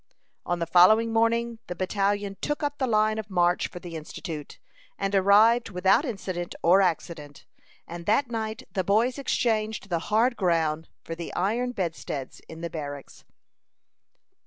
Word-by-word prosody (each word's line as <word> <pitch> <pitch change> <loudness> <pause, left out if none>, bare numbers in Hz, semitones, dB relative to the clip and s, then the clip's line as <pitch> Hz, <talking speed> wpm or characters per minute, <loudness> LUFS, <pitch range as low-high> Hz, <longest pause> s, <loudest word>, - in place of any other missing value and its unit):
On 175 - 0
the 170 - -2
following 215 +7 +5
morning 230 0 +1
the 180 - -5
battalion 200 +2 -1
took 295 0 -2
up 290 0 -2
the 260 - +1
line 215 -1 +2
of 215 -1 -7
march 175 -2 +2
for - - -11
the 175 -1 -9
Institute, 155 -1 -7 0.4
and 195 0 -2
arrived 210 +5 +5
without 190 - +3
incident 185 -7 -4
or 185 +4 +6
accident; 160 -5 -3 0.4
and 170 0 -8
that 245 +6 +3
night 220 -1 -4
the 190 - 0
boys 225 +8 +1
exchanged 220 -6 -1
the 170 -2 0
hard 230 +4 +3
ground 165 -5 0
for 165 - -6
the 170 0 -6
iron 230 +7 0
bedsteads 165 - -4
in 160 0 -9
the 170 - -3
barracks. 145 -4 -7
195 Hz, 155 wpm, -26 LUFS, 170-225 Hz, 0.4 s, or